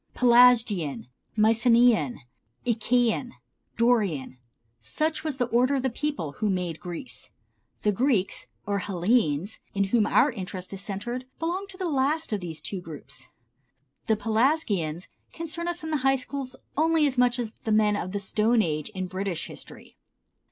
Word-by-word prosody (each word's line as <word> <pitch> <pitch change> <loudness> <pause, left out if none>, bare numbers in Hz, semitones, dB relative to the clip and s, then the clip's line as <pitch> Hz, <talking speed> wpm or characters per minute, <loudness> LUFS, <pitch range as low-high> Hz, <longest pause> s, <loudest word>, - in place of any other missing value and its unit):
Pelasgian, 225 - +4 0.3
Mycenean, 230 - +4 0.4
Achæan, 240 +1 +1 0.4
Dorian, 200 - +1 0.4
such 310 - -2
was 305 -4 -3
the 250 - +1
order 245 +3 +2
of 265 - -1
the 265 - 0
peoples 260 - -3
who 215 -1 +1
made 180 -4 -2
Greece. 180 +8 -7 0.5
The 210 - +3
Greeks, 220 -3 0 0.2
or 200 -1 0
Hellenes, 185 -2 0 0.2
in 200 - +2
whom 225 -3 +4
our 290 - +4
interest 185 -3 -6
is 195 - -3
centered, 240 +6 -4
belong 360 +5 -2
to 380 - -12
the 375 - -4
two 335 - -1
last 280 +1 0
of 205 - -1
these 165 -3 -5 0.2
groups. 160 -4 -11 0.8
The 220 - +4
Pelasgians 215 - 0 0.3
concern 335 +1 -4
us 345 -1 -2
in 320 - -4
the 305 - +2
high 270 0 +3
schools 265 0 -4 0.2
only 320 +1 +3
as 265 -3 0
much 245 0 +4
as 230 -3 -4
the 220 - -2
men 215 -1 +4
of 185 - -3
the 200 - -2
stone 215 +3 +2
age 155 0 -2
in 185 0 -2
British 185 -1 -3
history. - - -11
225 Hz, 155 wpm, -26 LUFS, 190-260 Hz, 0.8 s, Pelasgian